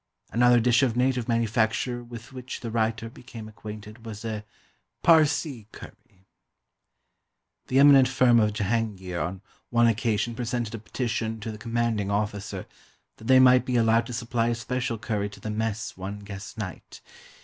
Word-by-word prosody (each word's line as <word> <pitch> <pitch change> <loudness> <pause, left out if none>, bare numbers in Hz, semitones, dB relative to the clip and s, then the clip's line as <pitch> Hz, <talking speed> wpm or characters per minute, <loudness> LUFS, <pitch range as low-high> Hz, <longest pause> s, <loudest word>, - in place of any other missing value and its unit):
Another 120 +1 +5
dish 120 +2 +3
of 120 -3 +1
native 125 -2 +1
manufacture 115 +1 0
with 120 0 -11
which 130 0 -7
the 115 - -5
writer 115 0 0
became 115 -3 -10
acquainted 110 +1 -10
was 110 -1 -8
a 110 -1 -4 0.6
Parsee 150 -7 +3
Curry. 95 -1 -14 1.4
The 130 - 0
eminent 140 -2 +7
firm 125 -2 +4
of 105 -1 +3
Jehangeer 105 -4 -2
on 90 +2 -4 0.3
one 120 0 +3
occasion 115 0 +1
presented 120 -1 -3
a 115 - -5
petition 115 0 -3
to 110 - -4
the 105 - -9
commanding 115 -3 -1
officer 100 -1 -2 0.5
that 110 - -13
they 130 0 +7
might 125 0 +6
be 125 - -2
allowed 115 0 +3
to 125 - -6
supply 115 0 -1
a 120 - +1
special 120 +1 -2
curry 105 -2 -2
to 105 - -13
the 110 - -5
mess 110 0 -3
one 95 +2 -6
guest 100 +2 -9
night. 100 -5 -7
115 Hz, 160 wpm, -26 LUFS, 105-120 Hz, 1.4 s, eminent